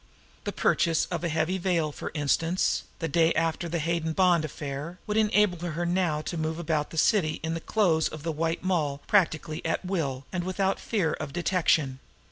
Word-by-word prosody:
The - - -1
purchase 165 -2 +2
of - - -2
a 170 - 0
heavy 160 +4 0
veil, 170 -4 +1
for - - -6
instance, 165 +4 +1
the 165 - -2
day 165 0 +3
after 165 +1 0
the 170 - -1
Hayden 165 0 -1
Bond 180 -2 +4
affair, 150 +2 -5
would 210 - -2
enable 210 -4 +3
her 175 0 -3
now 175 -4 +1
to 170 - -4
move 160 0 -2
about 155 -3 -1
the 160 - -9
city 155 -3 +2
in 160 0 -1
the 165 - -2
clothes 170 -8 +2
of 155 -1 -8
the 165 - -1
White 165 +3 -2
Moll 155 -7 0
practically 160 -5 +1
at 165 +3 -1
will 140 -8 -2
and 175 -2 -2
without 190 +1 0
fear 185 -9 0
of 140 - -5
detection. 160 -6 +1
165 Hz, 190 wpm, -27 LUFS, 155-180 Hz, -, Bond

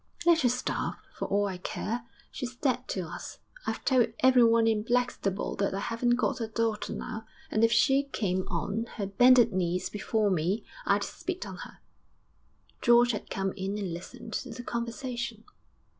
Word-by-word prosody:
'Let 340 -1 +5
her 245 - +4
starve, 250 +1 -1 0.2
for - - -4
all 205 +1 +2
I 190 -2 -4
care. 230 +6 -4 0.3
She's 250 -2 -5
dead 255 -1 0
to 190 - -2
us; 160 -4 -7 0.3
I've - - -3
told 255 -4 +4
everyone 235 -3 +6
in 220 -2 +2
Blackstable 240 -4 0
that 200 -1 0
I - - -1
haven't 235 +3 +1
got 240 0 0
a 225 - -1
daughter 220 -1 -1
now, 220 0 -5 0.2
and 215 - +2
if 230 - +5
she 270 +4 +4
came 185 -3 -1
on 215 +4 -2
her 205 - -1
bended 240 +3 +6
knees 180 0 0
before 210 0 0
me 185 +5 0 0.2
I'd - - +3
spit 370 0 -4
on - - -7
her.' - - -10 1.0
George 240 0 +6
had 210 - -5
come 195 -1 -1
in 195 +1 -3
and 195 -5 -3
listened 200 +6 -8
to 260 - -3
the 245 +1 -7
conversation. 235 -1 -4
225 Hz, 175 wpm, -29 LUFS, 200-245 Hz, 1.0 s, everyone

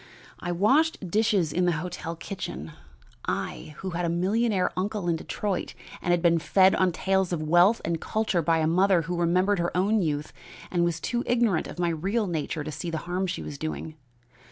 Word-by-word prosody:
I 175 - -3
washed 215 - +2
dishes 205 -7 +2
in 180 0 +2
the 175 - +3
hotel 165 +1 -4
kitchen 160 - -6 0.5
I 155 - -4
who 190 - -5
had 175 +1 -2
a 170 - +1
millionaire 190 +2 +1
uncle 200 0 -2
in 170 - +2
Detroit 190 +3 -3 0.3
and - - -3
had 175 0 +2
been 170 -1 +4
fed 185 +4 +4
on 185 -1 +2
tales 190 +1 0
of 165 -3 -1
wealth 175 +8 +4
and 165 0 -1
culture 215 -5 0
by 165 +1 +2
a 160 - +1
mother 180 +1 +3
who 175 +3 -3
remembered 180 +3 +2
her 175 0 -1
own 205 +3 +2
youth 150 -3 -2 0.4
and 175 -1 +2
was 170 -1 0
too 240 +5 -2
ignorant 235 -8 +2
of - - -9
my 175 -1 +1
real 195 +8 0
nature 160 -3 -3
to 155 - -5
see 170 +4 -5
the 165 - -2
harm 180 +2 -1
she - - -4
was 145 -2 -7
doing. 155 0 -4
175 Hz, 200 wpm, -26 LUFS, 165-195 Hz, 0.5 s, been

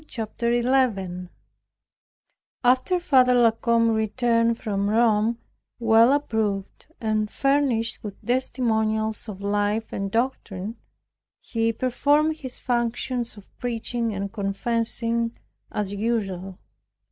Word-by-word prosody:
CHAPTER 235 +1 -3
11 230 -8 +1 1.3
After 255 +9 +3
Father 255 -7 +4
La 235 -2 +5
Combe 230 0 +2
returned 230 +1 +1
from 200 -2 -1
Rome, 225 0 +3 0.4
well 230 +1 +5
approved, 220 -8 -1
and 215 -1 0
furnished 275 -4 0
with 205 -2 -7
testimonials 220 -3 0
of 195 -2 -7
life 205 +2 -1
and 195 0 -2
doctrine, 225 -2 -2 0.6
he 225 0 -1
performed 290 +6 +1
his 260 -4 -5
functions 240 -1 -1
of 200 - -16
preaching 235 -1 -2
and 200 -1 -4
confessing 230 +2 -1 0.3
as 205 -1 -2
usual. 195 -4 -2
230 Hz, 100 wpm, -24 LUFS, 210-245 Hz, 1.3 s, La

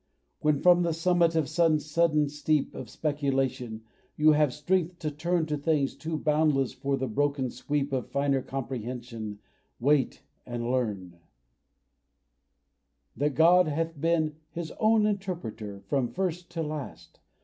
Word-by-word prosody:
When 150 -1 +2
from 175 -1 +6
the 170 -2 0
summit 170 0 +2
of 160 -3 +2
some 160 0 +3
sudden 150 0 +2
steep 150 0 0
Of 125 - -7
speculation 135 -6 -1 0.3
you 155 +1 +6
have 150 -2 +3
strength 175 +5 0
to 155 -3 -3
turn 170 +3 0
To 150 -1 -2
things 145 -2 +1
too 160 0 -4
boundless 150 -3 +2
for 140 0 -1
the 130 0 -2
broken 140 +2 0
sweep 140 +2 -2
Of 130 -2 -2
finer 140 -1 +1
comprehension, 120 -4 -5 0.4
wait 140 +2 +2 0.2
and 120 0 -3
learn 100 -9 -2 2.0
That 145 +1 0
God 175 +2 +6
hath 160 0 -2
been 160 -2 +1
"His 170 -2 -6
own 215 0 +4
interpreter" 165 - -4
From 135 0 0
first 180 +5 -3
to 165 -1 -2
last. 150 -2 -7
150 Hz, 140 wpm, -28 LUFS, 130-165 Hz, 2.0 s, from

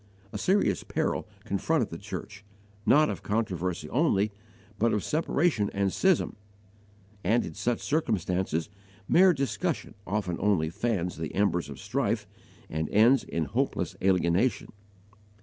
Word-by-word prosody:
A - - -2
serious 180 - +2
peril - - -1 0.2
confronted - - 0
the - - -6
church 105 -1 -7 0.4
not 150 +2 +6
of - - -4
controversy 90 -7 -2
only, 110 -7 +2 0.5
but 115 +1 +3
of 105 - 0
separation 150 -7 +1
and 100 -1 +1
schism; 190 -3 +2 0.9
and 110 +6 +2
in - - -7
such 120 -1 -1
circumstances 95 - 0 0.4
mere 185 +1 +6
discussion 155 +3 -2
often 95 -3 -1
only 90 -6 +2
fans 90 -4 -1
the 80 -1 -5
embers 90 -6 +1
of 70 - -8
strife - - -1 0.4
and 80 0 -3
ends 115 +5 +5
in 80 -1 -2
hopeless 70 - -1
alienation. 95 +4 +2
105 Hz, 130 wpm, -28 LUFS, 90-130 Hz, 0.9 s, not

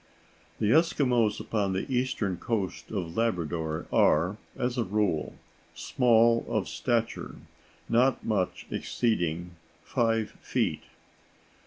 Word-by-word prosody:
The 105 - +1
Eskimos 125 -8 +3
upon 100 -3 -1
the 95 - -1
eastern 125 -8 -1
coast 100 -1 -3
of 90 -5 -4
Labrador 85 -7 -1
are, 90 +7 +3 0.2
as 125 0 -1
a 120 - +1
rule, 100 -6 -1 0.4
small 115 -2 +3
of - - 0
stature, 115 -1 -2 0.5
not 125 +3 +2
much 100 -5 -1
exceeding 90 -7 -1 0.3
five 115 -2 0
feet. - - -1
110 Hz, 105 wpm, -28 LUFS, 90-120 Hz, 0.5 s, Eskimos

